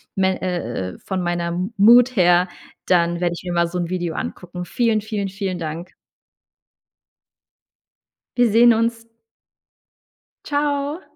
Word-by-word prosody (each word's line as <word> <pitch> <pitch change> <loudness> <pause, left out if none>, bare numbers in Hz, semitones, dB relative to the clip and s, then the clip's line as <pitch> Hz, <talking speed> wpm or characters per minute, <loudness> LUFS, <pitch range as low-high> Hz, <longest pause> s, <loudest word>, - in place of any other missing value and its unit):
mel 190 -1 +1
äh, 120 - -3
äh, - - -16
von 190 -2 -4
meiner 175 -1 -2 0.3
Mood 240 +5 +6
her, 180 -1 +4 0.4
dann 170 -1 +2
werde 175 -1 0
ich - - -10
mir 180 - -4
mal 170 0 +2
so 175 +2 -5
'n 175 -1 -2
Video 175 -3 -3
angucken. 180 0 -6
Vielen, 225 +1 0
vielen, 205 -2 -3
vielen 190 -2 -4
Dank. 165 +3 -6 2.4
Wir 245 -1 +5
sehen 235 +2 +6
uns. 230 0 -1 1.4
Tschau. 290 +2 -1
185 Hz, 130 wpm, -21 LUFS, 175-230 Hz, 2.4 s, Mood